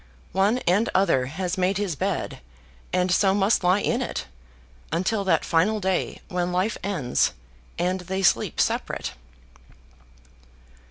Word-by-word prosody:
One 195 +6 +2
and 200 +6 +3
other 135 -10 +3
has 180 +5 -3
made 185 +1 +2
his 200 -6 -1
bed, - - -2 0.5
and 180 0 +1
so 190 +1 +3
must 200 0 +2
lie 180 +3 +3
in - - 0
it, - - -3 0.7
until 190 +6 0
that 190 - +2
final 190 +6 +2
day 190 -2 -1
when 180 0 -1
life 185 +5 0
ends, 170 -11 +1 0.4
and 180 +2 0
they 190 +2 -3
sleep 175 - +2
separate. - - -1
185 Hz, 130 wpm, -25 LUFS, 180-195 Hz, 0.7 s, and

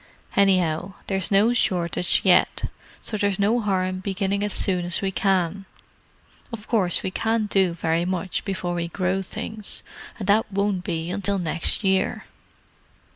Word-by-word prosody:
Anyhow, 185 -2 +2
there's 190 -3 0
no 210 +4 +4
shortage 180 -6 +2
yet, 180 -2 +4 0.4
so 215 - -3
there's 200 -1 +1
no 210 +4 +2
harm 190 -3 +1
in 185 0 -3
beginning 195 +1 -1
as 205 - -1
soon 185 -3 0
as 175 0 -2
we 195 -1 -1
can. 195 0 0 0.9
Of 220 -2 -8
course 195 -7 +1
we 185 - -2
can't 225 +1 0
do 190 -4 +2
very 165 0 0
much 185 0 -2
before 185 -3 -3
we 170 -1 -2
grow 185 +2 -1
things—and 210 +1 -5
that 210 +1 +3
won't 200 -2 0
be 165 -1 -3
until 200 +1 -1
next 165 +4 -1
year." 190 -1 +1
190 Hz, 150 wpm, -24 LUFS, 180-200 Hz, 0.9 s, no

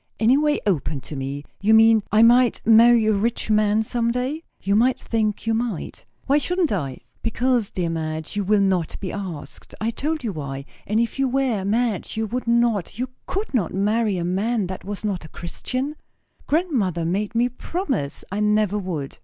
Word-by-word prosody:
"Any 230 +4 +5
way 295 +1 +2
open 155 -7 0
to 150 - -8
me? 135 +1 -4 0.2
You 220 +2 +4
mean, 225 0 +6
I 215 +1 +5
might 245 +1 +5
marry 230 +1 +6
a 215 - +3
rich 220 +2 -1
man 215 0 +3
some 235 +1 -1
day?" 255 +6 -2 0.2
"You 200 +1 0
might 250 +4 +3
think 215 -2 -1
you 225 - +1
might." 225 -6 -3 0.2
"Why 280 +2 +3
shouldn't 355 +1 0
I?" 140 -10 -3 0.2
"Because, 240 -1 0
dear 175 -3 -2
Madge, 160 0 -4
you 205 - 0
will 205 +1 +3
not 185 -4 0
be 185 - -5
asked. 175 -8 -7
I 220 +2 0
told 305 +4 -3
you 220 -4 -2
why. 140 -3 -5 0.2
And 215 +2 +1
if 235 +3 -1
you 270 -1 +2
were, 255 -6 0
Madge, 220 -1 -1
you 220 - 0
would 240 +3 -4
not, 235 -6 +1
you 250 +1 -2 0.2
could 400 -2 -3
not, 195 -9 0
marry 210 +1 +1
a 170 - -2
man 205 +4 0
that 185 +1 -6
was 205 +1 -5
not 195 -5 -2
a 155 - -11
Christian? 255 - -4 0.5
Grandmother 245 - 0
made 205 +6 -1
me 240 +1 +3
promise 250 - -3
I 200 - -2
never 210 -1 +2
would." 165 -8 -5
215 Hz, 190 wpm, -23 LUFS, 190-240 Hz, 0.5 s, mean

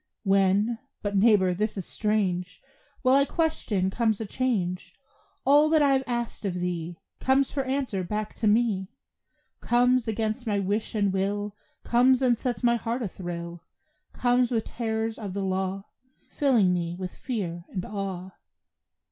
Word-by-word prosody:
When 195 +3 +2 0.2
but 205 -1 -2
neighbor, 195 -3 +4
this 210 +3 -2
is 190 - -4
strange! 190 -4 -1 0.4
While 255 0 +5
I 280 - +5
question 275 - 0
comes 220 -1 +1
a 220 - -3
change: 195 -7 -2 0.5
All 290 +3 +6
that 310 -1 +4
I 280 - +4
have 265 0 +2
asked 240 -2 -3
of 195 -3 -2
thee 175 -1 -3 0.2
Comes 265 +1 +2
for 280 - -1
answer 260 -8 -1
back 210 +3 -3
to 220 - 0
me. 210 -3 +2 0.7
Comes, 245 0 +2
against 220 +2 -2
my 205 -2 +1
wish 205 +4 -1
and 200 -2 +1
will, 205 +2 -1 0.3
Comes 255 +2 +4
and 240 -3 +3
sets 245 -5 -3
my 235 0 +4
heart 235 +2 -3
a - - -1
thrill; 170 -2 -6 0.5
Comes 245 0 +2
with 225 -3 0
terrors 225 -1 -3
of 200 -4 -6
the 200 - -1
law, 190 +1 -2 0.5
Filling 235 -11 +3
me 170 -1 -2
with 180 -1 -6
fear 175 -9 -4
and 185 -2 -4
awe. 190 -2 -5
210 Hz, 155 wpm, -27 LUFS, 190-240 Hz, 0.7 s, All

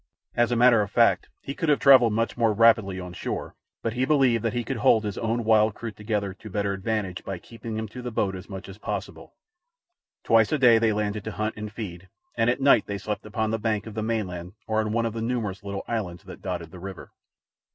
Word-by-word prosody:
As 120 0 +2
a - - +2
matter 120 -2 +6
of 100 - -2
fact, 115 +2 +3
he 140 - -5
could 165 +1 -2
have 145 - +5
travelled 130 -5 +6
much 115 +2 0
more 115 -3 +2
rapidly 110 -3 +4
on 90 -1 -7
shore, - - -4 0.3
but 115 - -1
he 125 +1 0
believed 130 -5 +3
that 115 - 0
he 120 -1 -1
could 135 +2 -3
hold 110 0 +4
his 105 -2 -3
own 115 +1 -1
wild 110 -1 +4
crew 115 -1 -6
together 105 -2 -3
to 110 +3 -11
better 100 0 -1
advantage 100 -2 -3
by 95 - -4
keeping 115 +3 -8
them 110 0 -3
to 125 +4 -8
the 125 - -4
boat 100 -4 -1
as 95 +1 -10
much 95 -1 -7
as 95 +1 -11
possible. - - -6 0.9
Twice 115 -2 +4
a 155 - +2
day 120 -4 +6
they 110 -1 +3
landed 105 -1 -2
to 110 - -3
hunt 110 +1 -2
and 105 0 -6
feed, 95 -5 -7 0.3
and 115 - +2
at 120 - +1
night 135 -5 +4
they 100 - -3
slept 105 +1 -5
upon 110 +1 -1
the 115 - -1
bank 105 -1 -1
of 110 - -8
the 110 - -3
mainland 95 -6 -3
or 110 0 0
on 110 -1 0
one 115 +1 +1
of 115 - -2
the 115 - -4
numerous 115 -5 -2
little 100 -1 -4
islands 100 -6 -3
that 95 -2 -11
dotted 85 -4 -4
the 90 - -10
river. 95 0 -8
110 Hz, 240 wpm, -25 LUFS, 100-115 Hz, 0.9 s, matter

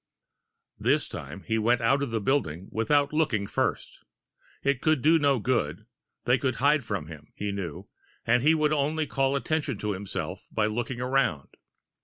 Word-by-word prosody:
This - - +2
time, 95 - -8
he 110 -1 0
went 120 +3 +3
out 135 +5 +2
of 140 - -1
the 115 -1 -1
building 100 - -1
without 145 +6 +2
looking 130 -10 +1
first. - - -2 0.6
It 140 -2 +1
could 155 -5 +2
do 160 +2 +5
no 140 -2 +3
good 110 - -1 0.4
they 125 +2 +3
could 130 -2 0
hide 145 +1 +3
from 100 -7 -3
him, 75 -2 -12
he 105 0 -3
knew, 95 -6 -5 0.4
and 120 +2 +3
he 155 +5 +4
would 155 -1 +2
only 155 +2 0
call 135 -1 0
attention 145 -3 -1
to 105 +1 -2
himself 100 0 -5
by 110 - +1
looking 120 +3 -2
around. 125 - 0
125 Hz, 170 wpm, -27 LUFS, 105-140 Hz, 0.6 s, do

